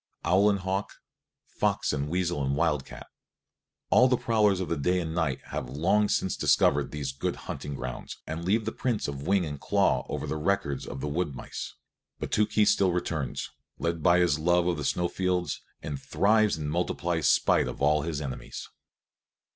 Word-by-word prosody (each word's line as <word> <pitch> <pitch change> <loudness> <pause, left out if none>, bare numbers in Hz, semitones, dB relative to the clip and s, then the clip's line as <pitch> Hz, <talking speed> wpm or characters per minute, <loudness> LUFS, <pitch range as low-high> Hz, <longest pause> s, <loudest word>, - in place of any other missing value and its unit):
Owl 100 +4 +4
and 100 - +2
hawk, 95 +2 -2 0.5
fox - - 0
and 70 0 -2
weasel 85 -3 0
and 70 +1 0
wildcat, 75 -3 -1 0.9
all 125 - +7
the 125 -1 +2
prowlers 105 -5 +2
of 95 - -2
the 85 - 0
day 90 +6 +1
and 80 -2 -3
night 80 -5 0
have - - -4
long 95 +10 +2
since 95 - 0
discovered 70 0 +3
these 70 -3 -3
good 65 - -3
hunting 75 -1 -5
grounds 65 -2 -6
and 80 +2 -5
leave 105 +5 +1
the 110 - -1
prints 120 -3 -1
of 70 +2 -5
wing 95 -2 +3
and 75 -2 -6
claw - - +2
over - - -3
the 80 - -3
records 80 -3 -1
of 70 - -6
the - - -2
wood 75 -1 -2
mice; - - -7 0.4
but - - -5
still 105 0 +3
Tookhees 105 -1 +3
returns, 85 -7 -1 0.3
led 85 -1 -2
by 85 +2 +5
his 85 -4 +3
love 90 +2 +3
of 90 -2 0
the 75 - -4
snow 90 +5 +1
fields, 90 -1 -1 0.2
and 70 -2 -5
thrives 110 -2 +2
and 75 -1 -3
multiplies 85 -2 0
spite - - +3
of - - -6
all 75 +2 +3
his 80 -1 -3
enemies. 65 -3 -6
85 Hz, 185 wpm, -28 LUFS, 75-95 Hz, 0.9 s, all